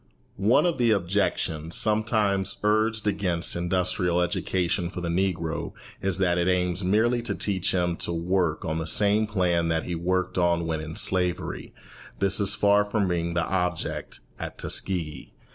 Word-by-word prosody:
One 115 - +3
of 170 -5 0
the 120 -1 +3
objections 85 -5 0
sometimes 105 -3 +1
urged 110 +1 +1
against 95 -5 0
industrial 90 0 +1
education 90 0 -1
for 90 - -6
the 85 -1 -3
Negro 85 -2 -1 0.3
is 95 -2 0
that 90 -2 +1
it 85 - +1
aims 90 0 +1
merely 110 +6 +2
to 115 - -3
teach 95 -4 0
him 90 -2 0
to - - -2
work 85 -1 0
on 80 0 -2
the 80 - -4
same 105 +5 +3
plan 90 -5 +1
that 80 -1 0
he 90 - -4
worked 95 +2 -1
on 85 -1 +2
when 80 -1 -2
in 80 +1 -7
slavery. 90 -1 0 0.5
This 100 -1 +2
is 100 0 +2
far 100 0 +4
from 105 -1 -1
being 85 -1 -1
the 85 - +1
object 90 -3 -3 0.2
at - - -6
Tuskegee. 85 -6 -3
90 Hz, 160 wpm, -26 LUFS, 85-100 Hz, 0.5 s, far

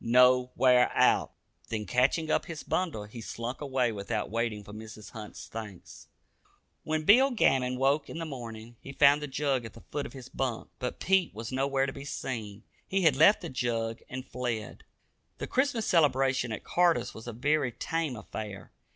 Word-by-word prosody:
No 125 +1 +5
wear 125 -1 +5
out." - - +3 0.4
Then, 110 -2 -3
catching 140 +7 +2
up - - +1
his 165 -2 -6
bundle, 165 - -1
he 110 +3 -9
slunk 115 +4 -5
away 130 -4 +1
without 100 -1 -3
waiting 115 -2 -1
for 105 - -11
Mrs. 110 0 -10
Hunt's 110 -2 -9
thanks. 105 -5 -9 0.8
When 155 0 -1
Bill 250 - +6
Gammon 130 - +2
woke 140 +3 +2
in - - -6
the 165 - -3
morning, 120 -5 -8
he 140 - -9
found 145 +1 +5
the 150 - -3
jug 135 -2 0
at 115 - -9
the 115 - -14
foot 145 -1 -2
of - - -14
his 130 -2 -9
bunk. 130 -4 -3
But 125 - -4
Pete 190 - +2
was 110 +2 -6
nowhere 135 +1 +1
to 135 - -4
be 140 - -8
seen. 110 -7 -5 0.2
He 195 0 0
had 155 -5 +5
left 160 +9 +6
the 170 - -5
jug 115 -3 -2
and 130 +1 -6
fled. 120 -5 -4 0.5
The - - -4
Christmas 255 -4 0
celebration 135 -6 +2
at 110 - -5
Carter's 175 -1 +2
was 110 +2 -10
a - - -3
very 140 +3 +1
tame 160 +2 -2
affair. 105 -2 -7
130 Hz, 185 wpm, -29 LUFS, 115-150 Hz, 0.8 s, Bill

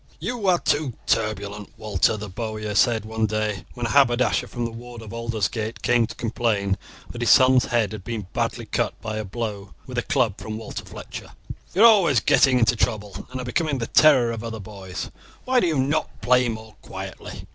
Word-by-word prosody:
"You 240 -5 -3
are 180 -2 +5
too 145 -6 0
turbulent, 105 -1 -2
Walter," 105 0 +1
the 105 0 -6
bowyer 110 +1 -4
said 110 +1 +3
one 110 0 -1
day 105 -4 -2
when 120 - -3
a - - -1
haberdasher 125 -3 +3
from 120 -1 -4
the 115 - -4
ward 120 0 -10
of 110 - -9
Aldersgate 115 -1 -3
came 120 -2 +3
to - - -9
complain 110 -4 -1 0.3
that 120 - -7
his 120 - +1
son's 130 -1 +6
head 115 -4 +1
had 105 -3 -7
been 115 -3 -4
badly - - -2
cut - - -2
by 110 -1 -4
a 110 - -2
blow 105 -1 -5
with 125 -2 -3
a - - 0
club 125 - 0
from 110 0 -5
Walter 110 - -7
Fletcher. - - -9 0.4
"You 200 - +5
are - - +10
always 190 - +6
getting 130 +3 +4
into 120 0 +3
trouble, 105 -3 -2
and 130 0 -6
are 125 - -4
becoming 145 +3 0
the 115 - -2
terror 130 -4 +5
of 115 -1 -5
other 115 -1 -5
boys. 95 -3 -7 0.3
Why 255 0 +3
do 180 - +2
you 160 -3 0
not 140 +4 -1
play 125 0 +3
more 110 -1 -7
quietly? - - -8
115 Hz, 200 wpm, -24 LUFS, 110-125 Hz, 0.4 s, are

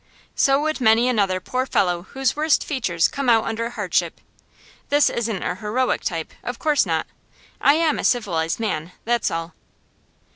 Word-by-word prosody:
So 275 0 +3
would 310 -3 -2
many 225 +1 +4
another 200 -6 +1
poor 255 +7 -2
fellow 180 -7 +1
whose 270 -2 -1
worst 305 0 +2
features 190 - 0
come 275 -3 -2
out 225 -2 +5
under 230 +1 -3
hardship. 240 - -1 0.7
This 290 +1 +4
isn't 225 -5 -2
a - - -1
heroic 230 +6 -1
type; 165 -2 -4
of 245 0 -4
course 300 -2 +2
not. - - 0 0.6
I 285 - +5
am 320 -1 +1
a - - -3
civilised 170 -9 0
man, 180 -6 -3
that's 240 0 +1
all. 165 +1 -4
230 Hz, 160 wpm, -22 LUFS, 185-270 Hz, 0.7 s, out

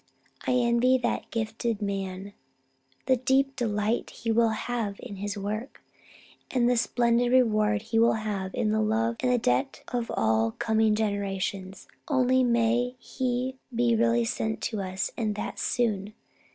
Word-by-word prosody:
I - - +3
envy 245 +1 +3
that 240 -1 -2
gifted 225 0 -2
man 195 -1 -4 0.7
the 260 0 +3
deep 270 +2 +2
delight 220 -2 -1
he 230 0 -3
will 230 0 +4
have 220 -2 -2
in 215 -6 -8
his 205 +1 -4
work, 215 +6 -5 0.7
and 245 -2 +2
the 245 - +3
splendid 235 +1 +2
reward 215 -4 +3
he 225 0 0
will 230 +1 +5
have 210 -3 -3
in 215 - +1
the 220 0 +2
love 225 +2 +1
and 250 -1 +1
the 250 - +3
debt 125 - 0
of 240 -1 -2
all 110 0 +2
coming 220 -1 +2
generations. 195 -2 -3 0.2
Only, 260 -2 +3
may 240 +1 +2
he 255 +1 -3 0.2
be 235 0 +3
really 230 +1 +2
sent 220 -1 -2
to 210 - -2
us, 190 0 -3
and 215 -3 -1
that - - -5
soon! 215 -4 -1
225 Hz, 150 wpm, -27 LUFS, 205-245 Hz, 0.7 s, will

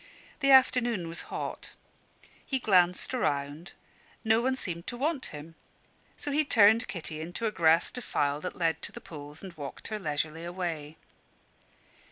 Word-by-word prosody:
The 275 -2 +2
afternoon 240 -7 +5
was 165 +1 -5
hot. - - -5 0.7
He 270 - -1
glanced 185 -4 +3
round 150 - -2 0.5
no 220 0 +4
one 260 +2 +1
seemed 170 -9 -5
to 245 - -4
want 285 +1 -1
him: 150 +2 -9 0.6
so 290 - -4
he 300 +2 +3
turned 225 -3 +5
Kitty 155 -3 -5
into 175 +8 -4
a 220 - +1
grassy 165 -3 +3
defile 145 - -1
that 180 - -5
led 165 -2 0
to - - -4
the - - -9
pools, 150 0 -10
and 190 -2 -8
walked 145 -4 -7
her 215 -1 -3
leisurely 155 -1 -2
away. 170 -4 -4
175 Hz, 155 wpm, -29 LUFS, 155-235 Hz, 0.7 s, afternoon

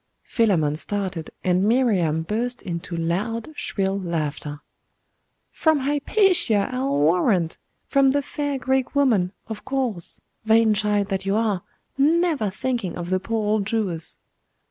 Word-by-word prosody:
Philammon 175 -10 +1
started, 185 -3 -3
and 180 +1 +2
Miriam 200 -9 +2
burst 240 +7 -2
into 170 -2 -5
loud, 205 - -2
shrill 195 -5 -1
laughter. 150 -4 -3 0.9
'From 315 -3 +2
Hypatia, 290 - +2
I'll 255 - 0
warrant! 170 - +2 0.3
From 275 -1 +4
the 285 +1 +1
fair 290 0 -2
Greek 265 +1 -1
woman, 225 -11 +3
of 220 -2 -7
course 250 -10 -1 0.2
vain 220 0 +4
child 210 -1 0
that 195 -1 -2
you 195 - +2
are 215 -4 +1 0.4
never 315 - +2
thinking 210 -2 -3
of 175 +1 -5
the 185 - +2
poor 220 +2 -2
old 210 -1 +1
Jewess. 195 -8 -2
210 Hz, 130 wpm, -23 LUFS, 180-255 Hz, 0.9 s, From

